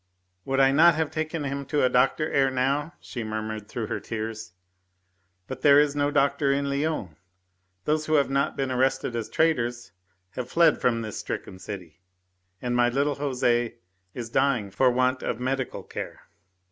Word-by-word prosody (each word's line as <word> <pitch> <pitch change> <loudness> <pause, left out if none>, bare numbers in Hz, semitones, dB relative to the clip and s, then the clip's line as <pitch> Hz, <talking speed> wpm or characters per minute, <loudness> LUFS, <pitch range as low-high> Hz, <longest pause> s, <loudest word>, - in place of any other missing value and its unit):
"Would 135 0 0
I 135 0 +6
not 165 +4 +6
have 160 -1 -1
taken 155 0 -3
him 140 0 -3
to 150 0 +1
a - - +6
doctor 135 +5 +2
ere 135 -1 +3
now?" 140 +5 0
she 120 - -6
murmured 110 -1 -4
through 115 +1 -4
her - - -3
tears. 110 -3 -5 0.9
"But 130 +3 -7
there 140 0 +7
is 145 -1 +2
no 145 0 +1
doctor 140 -1 +2
in 140 0 0
Lyons. 140 - -2 0.7
Those 155 0 0
who 155 - +2
have 140 -2 +4
not 140 0 0
been 135 -1 -1
arrested 130 -1 0
as 110 -2 -3
traitors 120 -7 0 0.4
have 125 +2 -5
fled 165 -2 +4
from 115 -2 +2
this 110 -2 -5
stricken 95 - -6
city. 90 -4 -8 0.6
And 120 -1 -1
my 120 0 +4
little 140 +4 +1
Jose 125 -4 0 0.4
is 115 -2 -6
dying 125 -8 +1
for 130 +6 +3
want 130 +1 +1
of 115 - -3
medical 130 0 -2
care." - - -7
130 Hz, 170 wpm, -26 LUFS, 120-145 Hz, 0.9 s, there